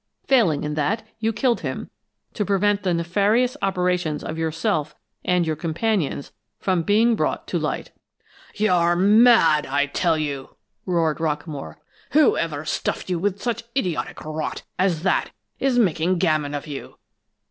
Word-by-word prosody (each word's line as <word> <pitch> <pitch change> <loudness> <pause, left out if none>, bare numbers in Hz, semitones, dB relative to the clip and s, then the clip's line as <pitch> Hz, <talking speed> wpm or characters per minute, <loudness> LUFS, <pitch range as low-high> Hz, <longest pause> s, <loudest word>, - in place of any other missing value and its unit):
Failing 210 - +3
in 150 0 -2
that, 175 +10 -1
you 225 0 +1
killed 240 +1 +1
him, 130 -5 -5 0.4
to 210 - -1
prevent 205 +1 +1
the 185 -1 0
nefarious 205 +9 +1
operations 180 -5 0
of 160 - -4
yourself 155 -2 -1 0.3
and 180 -1 +2
your 160 -1 -1
companions 165 -1 -1 0.3
from 185 -3 0
being 220 +6 +3
brought - - -1
to - - 0
light!" - - -3 0.6
"You're 175 -5 +3
mad, 205 -4 +5
I 145 +1 +1
tell 160 +3 +1
you!" 140 -3 -4 0.3
roared 165 -4 +1
Rockamore. 150 -2 -3 0.4
"Whoever 165 - +2
stuffed 165 - -2
you 175 - 0
with 200 +2 -2
such 235 -1 -2
idiotic 180 - -2
rot 155 0 -4 0.2
as 180 -4 +1
that 190 - +1 0.3
is 265 -2 +1
making 180 -4 +2
gammon 155 -5 +1
of 145 - -5
you! 145 -3 -8
175 Hz, 145 wpm, -23 LUFS, 155-205 Hz, 0.6 s, mad